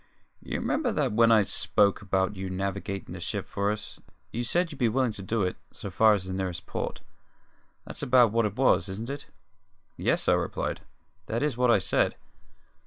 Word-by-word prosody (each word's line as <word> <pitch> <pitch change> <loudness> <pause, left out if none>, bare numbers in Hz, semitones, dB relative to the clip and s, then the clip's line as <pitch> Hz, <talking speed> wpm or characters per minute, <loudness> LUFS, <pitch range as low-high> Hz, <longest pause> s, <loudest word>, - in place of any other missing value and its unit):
You - - -4
remember - - 0
that - - +1
when 115 +2 +5
I 110 -2 +6
spoke 100 0 +2
about 95 0 0
you 95 0 -5
navigatin' 95 +1 -4
the - - -7
ship - - -3
for 100 0 -1
us, 105 0 -5 0.3
you 120 - -2
said 170 +7 +1
you'd 145 - -10
be 120 - +3
willin' 130 +1 +1
to 105 - -7
do 105 +2 -1
it 90 - -2
so 100 - -7
far 110 +4 +5
as 95 -2 -4
the 95 - -5
nearest 95 -2 -3
port. - - -4 0.8
That's - - -6
about 125 -3 +5
what 115 -1 +2
it 100 - -7
was, 130 -5 +3
isn't 110 +7 -5
it?" 140 - -6 0.7
"Yes," - - +1
I - - +5
replied. - - -2 0.5
"That 115 +4 -1
is 150 -5 0
what 125 0 +2
I 115 - +6
said." 95 - +1
105 Hz, 195 wpm, -27 LUFS, 95-120 Hz, 0.8 s, I